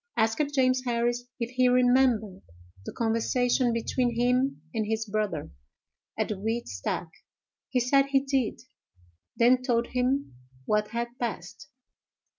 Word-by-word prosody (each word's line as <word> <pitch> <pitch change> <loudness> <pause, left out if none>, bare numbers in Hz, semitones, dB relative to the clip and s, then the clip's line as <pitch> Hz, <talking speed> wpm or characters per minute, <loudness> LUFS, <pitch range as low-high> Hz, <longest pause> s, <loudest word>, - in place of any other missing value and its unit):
Asked 285 +7 +1
James 255 -1 +3
Harris 240 0 0
if 235 0 -3
he 255 0 +3
remembered 245 - +3 0.5
the - - -3
conversation 240 +2 +1
between 235 +1 -1
him 250 - +1
and 220 - 0
his 220 0 -1
brother, 205 - -2 0.7
at - - -1
the 210 -3 -3
wheat 225 +3 -2
stack; 95 - -4 0.6
he 255 - +1
said 275 +3 +3
he 275 -1 +3
did; 270 -4 -1 0.8
then 250 +2 +5
told 240 -2 +1
him 255 - 0 0.3
what 210 +4 +1
had 235 +1 -3
passed. 175 -10 -5
240 Hz, 130 wpm, -27 LUFS, 220-255 Hz, 0.8 s, then